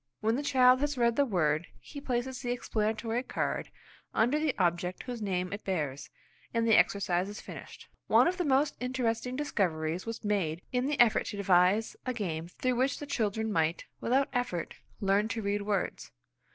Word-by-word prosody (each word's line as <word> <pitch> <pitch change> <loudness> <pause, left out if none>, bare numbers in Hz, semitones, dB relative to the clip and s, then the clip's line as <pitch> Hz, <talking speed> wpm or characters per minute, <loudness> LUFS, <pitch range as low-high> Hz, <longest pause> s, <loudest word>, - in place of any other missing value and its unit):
When 220 +2 +1
the 275 - -1
child 255 -3 +5
has 290 0 -1
read 235 -1 +3
the 285 -1 +3
word, 155 -5 +1
he 285 - -10
places 255 0 -2
the 245 - -4
explanatory 225 -1 -1
card - - -2 0.5
under 250 +7 +3
the 305 -3 0
object 180 0 0
whose 245 -3 -6
name 185 -2 -1
it 205 - -6
bears, 150 -8 -3 0.5
and 230 0 +2
the 225 - +5
exercise 185 -1 +2
is 205 - -7
finished. - - -10 0.2
One - - +5
of 365 +1 0
our 340 - 0
most 280 +2 +3
interesting 250 -1 -1
discoveries 180 - -1
was 230 -1 -5
made 180 -5 0
in 250 +1 0
the 295 -1 -1
effort 235 -2 +4
to 205 - -5
devise 190 +2 +3
a 255 - -2
game 170 -7 -3
through 250 +7 -1
which 265 +3 +1
the 290 - -6
children 220 -4 -1
might, 165 -3 0
without 270 +4 +1
effort, 245 -10 -2 0.3
learn 200 +1 +2
to 225 +1 -3
read 200 +1 0
words. 200 -1 -2
220 Hz, 180 wpm, -30 LUFS, 185-255 Hz, 0.5 s, child